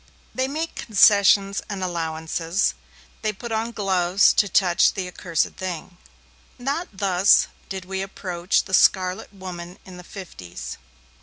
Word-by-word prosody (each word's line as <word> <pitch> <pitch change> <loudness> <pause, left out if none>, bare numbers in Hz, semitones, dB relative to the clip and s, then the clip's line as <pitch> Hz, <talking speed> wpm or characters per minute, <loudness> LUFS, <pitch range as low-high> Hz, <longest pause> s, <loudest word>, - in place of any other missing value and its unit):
They 260 0 0
make 315 +4 -3
concessions 200 -2 +4
and 195 -2 -4
allowances, 165 +1 -1 0.5
they 215 - 0
put 230 +3 -8
on 225 +1 -1
gloves 190 -3 +3
to 205 - +2
touch 180 0 +3
the 190 -2 -3
accursed 170 -3 -1
thing. 180 -1 -6 0.6
Not 280 +8 -2
thus 195 -1 +4 0.2
did 190 -1 -5
we 190 +1 -3
approach 180 -2 -1
the 190 - -10
Scarlet 185 0 +3
Woman 180 -2 -8
in 185 -1 -11
the 180 - -10
'fifties. 90 - -9
190 Hz, 135 wpm, -23 LUFS, 175-205 Hz, 0.6 s, concessions